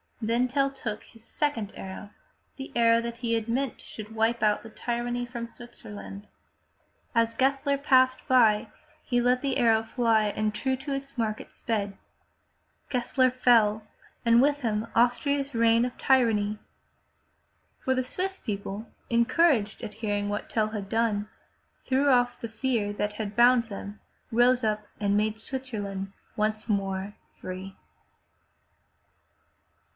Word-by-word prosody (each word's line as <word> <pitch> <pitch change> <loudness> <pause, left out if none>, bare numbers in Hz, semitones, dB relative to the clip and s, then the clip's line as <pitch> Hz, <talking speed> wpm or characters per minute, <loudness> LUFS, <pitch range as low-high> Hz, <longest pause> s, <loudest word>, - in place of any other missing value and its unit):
Then 235 +2 +1
Tell 275 +2 +1
took 230 -6 -5
his 225 -1 -18
second 230 -9 -2
arrow, 195 +2 -8 0.4
the 270 0 -8
arrow 230 -1 +4
that 235 0 -5
he 235 -1 -1
had 225 -1 0
meant 255 +1 -2
should 215 0 -9
wipe 225 +1 +1
out 210 -1 +2
tyranny 240 0 -2
from 235 -1 -5
Switzerland. 105 - -10 0.9
As 230 0 +2
Gessler 275 +1 +1
passed 260 -2 +3
by, 225 -5 +4 0.4
he 245 -2 +1
let 250 +1 +2
the 275 -2 0
arrow 225 -2 +4
fly, 225 -1 +2
and 215 0 0
true 265 +4 0
to 275 +2 -5
its 275 0 -6
mark 215 -2 0
it - - -15
sped. 200 -3 -2 0.9
Gessler 255 +1 +2
fell 225 -4 +3 0.4
and 235 0 +5
with 290 +1 +2
him 220 -2 -1
Austria's 275 +4 +2
reign 230 0 +4
of 250 - -6
tyranny. 215 -5 +2 1.2
For 260 - 0
the 255 - +1
Swiss 380 +9 -3
people, 205 0 -5 0.2
encouraged 235 -1 +2
at 210 - -6
hearing 205 -2 -2
what 205 0 -4
Tell 215 -1 +1
had 210 -3 -5
done, 215 -2 0 0.6
threw 270 +2 +2
off 245 -2 +3
the 230 - -4
fear 225 -2 -1
that 210 0 -2
had 210 -1 -5
bound 240 0 +5
them, 205 -1 -8 0.3
rose 245 +2 +4
up 215 -1 -1
and 205 -1 +2
made 215 +1 0
Switzerland 205 -7 -3 0.2
once 215 +1 -1
more 195 0 -1 0.2
free. 185 +1 -7
230 Hz, 140 wpm, -27 LUFS, 210-255 Hz, 1.2 s, and